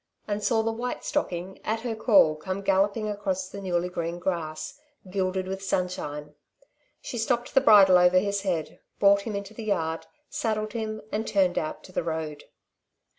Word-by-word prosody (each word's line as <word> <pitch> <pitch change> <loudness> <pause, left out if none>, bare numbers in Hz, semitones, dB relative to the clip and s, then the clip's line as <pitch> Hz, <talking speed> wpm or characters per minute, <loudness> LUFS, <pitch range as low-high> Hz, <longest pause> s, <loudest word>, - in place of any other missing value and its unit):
and 205 0 -2
saw 225 0 +2
the 225 - 0
white 245 +2 -4
stocking, 180 +2 -2
at 225 +1 -1
her 235 -1 -2
call, 205 -9 +5
come 190 +5 -5
galloping 200 +3 +2
across 195 -3 -2
the 200 +1 -8
newly 180 -2 0
green 170 -1 -3
grass, 170 - -3 0.3
gilded 185 -1 -1
with 190 0 -4
sunshine. 150 -6 -3 0.7
She 240 - -5
slipped 240 +2 0
the 270 - +5
bridle 195 -7 +7
over 180 +1 +5
his 200 +1 +1
head, 175 -6 -2 0.2
brought 200 0 +5
him 215 - -3
into 200 +1 -5
the 220 0 -7
yard, 165 -6 -1 0.2
saddled 215 -1 -2
him 215 -1 -4
and 215 +2 -2
turned 185 -3 +2
out 155 - -5
to - - -13
the - - -1
road. 160 -3 -4
195 Hz, 175 wpm, -27 LUFS, 180-215 Hz, 0.7 s, bridle